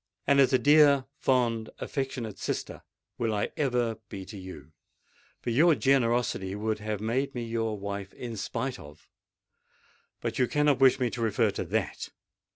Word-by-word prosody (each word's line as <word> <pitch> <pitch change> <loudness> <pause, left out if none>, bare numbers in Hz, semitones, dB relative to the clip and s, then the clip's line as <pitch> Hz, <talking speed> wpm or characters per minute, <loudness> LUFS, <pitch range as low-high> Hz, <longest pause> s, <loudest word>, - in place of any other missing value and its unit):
And 140 0 +4
as 135 - +5
a 130 - +5
dear, 145 -1 +5
fond, 115 -4 +1
affectionate 130 -6 -4
sister - - -4 0.4
will 115 -2 0
I 105 - -1
ever 120 -6 0
be 95 -1 -7
to 105 - -10
you; 85 -6 -10 0.7
for 120 - -3
your 155 +7 +5
generosity 120 -8 +1
would 110 +1 -2
have 105 -1 -4
made 130 +5 -1
me 120 - -3
your 115 -2 -2
wife 100 -1 -5
in 120 -2 -6
spite 120 +5 -3
of——But 75 - -12
you 125 - +3
cannot 150 -1 +2
wish 135 0 +5
me 125 -2 0
to 120 - -5
refer 110 -3 +2
to - - -3
that! - - -2
115 Hz, 160 wpm, -28 LUFS, 105-135 Hz, 0.7 s, as